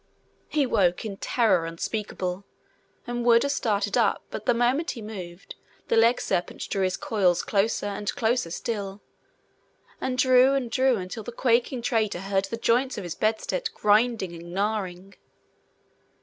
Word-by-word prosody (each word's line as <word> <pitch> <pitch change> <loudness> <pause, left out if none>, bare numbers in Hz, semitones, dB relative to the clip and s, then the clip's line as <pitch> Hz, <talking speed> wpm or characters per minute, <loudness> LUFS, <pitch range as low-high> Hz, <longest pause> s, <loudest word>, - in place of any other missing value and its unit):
He 295 -3 +2
woke 195 -6 +1
in 200 -3 -5
terror 195 -10 +2
unspeakable, 185 +1 -4 0.6
and 240 0 -3
would 235 -1 +5
have 280 - 0
started 205 -6 0
up - - +2
but - - -6
the 245 - +5
moment 255 +8 +1
he 240 - -4
moved, 185 -4 -8 0.4
the - - +3
legserpent 230 -5 +1
drew 195 - 0
his 185 -1 0
coils 185 -5 +1
closer, 205 +1 0
and 205 0 -2
closer 235 -4 0
still, 200 +1 -4 1.0
and 255 -1 -2
drew 255 +1 +5
and 250 -4 -2
drew 260 0 +3
until 190 +3 -5
the 230 - -7
quaking 240 +1 +1
traitor 220 -7 0
heard 195 0 0
the 230 +4 -5
joints 245 +3 +1
of 205 - -4
his 175 -2 -4
bedstead 225 - -1
grinding 210 -3 +2
and 170 0 -10
gnarring. 195 -1 -2
215 Hz, 150 wpm, -26 LUFS, 195-240 Hz, 1.0 s, would